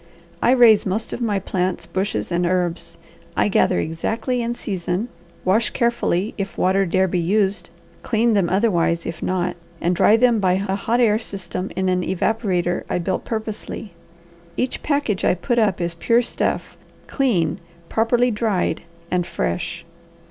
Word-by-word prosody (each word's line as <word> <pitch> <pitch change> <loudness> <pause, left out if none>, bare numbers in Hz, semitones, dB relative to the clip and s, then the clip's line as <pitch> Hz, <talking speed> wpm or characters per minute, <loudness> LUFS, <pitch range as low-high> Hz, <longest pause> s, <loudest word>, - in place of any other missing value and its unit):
I - - +3
raise 240 -4 +6
most 210 +3 -2
of - - -5
my 215 -4 +1
plants, 180 -2 -2
bushes, 190 +3 -2
and 175 +1 +1
herbs. 175 -1 -1 0.4
I - - +3
gather - - +3
exactly 225 - -2
in 235 0 -2
season, 190 +1 -3 0.4
wash 210 +5 +3
carefully 235 -5 0
if 195 0 -4
water 190 +1 +2
dare 190 +2 +2
be 180 0 0
used, 190 0 +1 0.3
clean 230 0 +2
them 195 -4 +2
otherwise 175 -4 +1
if 165 -1 -5
not, 180 -1 -1 0.2
and 175 +1 +1
dry 205 +4 +5
them 240 -1 +4
by 185 -2 +3
a 190 +1 -1
hot 225 +5 0
air 220 -3 +4
system 190 -3 -5
in 190 0 0
an 180 0 +2
evaporator 185 -2 0
I - - 0
built 180 +2 -2
purposely. 220 -3 -5 0.6
Each 255 - -1
package 285 -10 0
I - - +3
put 235 +7 0
up 205 -5 +2
is 170 -1 -1
pure 230 +8 +2
stuff, - - -2 0.3
clean, 185 - 0 0.3
properly 240 +4 +2
dried, 210 -4 0 0.3
and 180 -1 0
fresh. 170 -1 -3
195 Hz, 155 wpm, -21 LUFS, 180-225 Hz, 0.6 s, raise